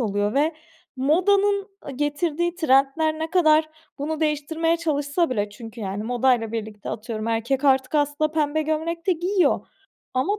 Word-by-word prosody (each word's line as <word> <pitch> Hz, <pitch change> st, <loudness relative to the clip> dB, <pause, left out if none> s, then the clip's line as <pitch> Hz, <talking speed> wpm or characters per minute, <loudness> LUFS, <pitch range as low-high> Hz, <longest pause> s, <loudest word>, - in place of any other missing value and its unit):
oluyor 205 Hz, -1 st, 0 dB
ve 305 Hz, +3 st, +2 dB, 0.4 s
modanın 395 Hz, +8 st, +2 dB, 0.2 s
ı -, -, -3 dB
getirdiği 295 Hz, +5 st, -1 dB
trendler 310 Hz, 0 st, +2 dB
ne 320 Hz, 0 st, -3 dB
kadar 315 Hz, -3 st, +4 dB, 0.3 s
bunu 310 Hz, +2 st, -3 dB
değiştirmeye 320 Hz, +2 st, 0 dB
çalışsa 310 Hz, 0 st, 0 dB
bile 205 Hz, -4 st, -1 dB
çünkü 225 Hz, +2 st, -10 dB
yani 200 Hz, 0 st, -3 dB
modayla 240 Hz, -1 st, +1 dB
birlikte, 215 Hz, -2 st, -5 dB
atıyorum, 220 Hz, 0 st, -5 dB
erkek 235 Hz, +5 st, -1 dB
artık 265 Hz, 0 st, +3 dB
aslında 295 Hz, +1 st, +1 dB
pembe 310 Hz, 0 st, +1 dB
gömlek 325 Hz, +2 st, -2 dB
de 375 Hz, -, +4 dB
giyiyor. 360 Hz, +3 st, +1 dB, 0.5 s
Ama 375 Hz, +12 st, 0 dB
295 Hz, 145 wpm, -23 LUFS, 245-325 Hz, 0.5 s, kadar